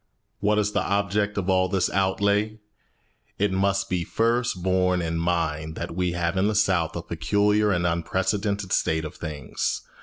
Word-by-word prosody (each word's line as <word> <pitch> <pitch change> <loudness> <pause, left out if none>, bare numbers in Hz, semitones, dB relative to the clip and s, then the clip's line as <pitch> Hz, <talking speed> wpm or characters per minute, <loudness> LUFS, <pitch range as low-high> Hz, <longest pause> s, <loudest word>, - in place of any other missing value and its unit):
What 105 +1 +2
is 105 -1 +1
the 100 - +1
object 100 +1 0
of 95 -2 -1
all 95 -1 +3
this 95 -1 +1
outlay? 100 +3 +1 0.8
It 100 0 +1
must 100 +1 +1
be 90 -2 -1
first 115 -1 0
borne 90 -1 +2
in 85 -1 -2
mind 80 -2 -1
that - - -5
we 90 -1 0
have 85 +1 -1
in 95 +2 +3
the 110 - 0
South 95 -6 +2
a - - -4
peculiar 105 +1 +1
and 90 -2 +1
unprecedented 95 +3 -1
state 80 0 +1
of 75 - -6
things. 75 -5 -3
95 Hz, 170 wpm, -25 LUFS, 85-105 Hz, 0.8 s, all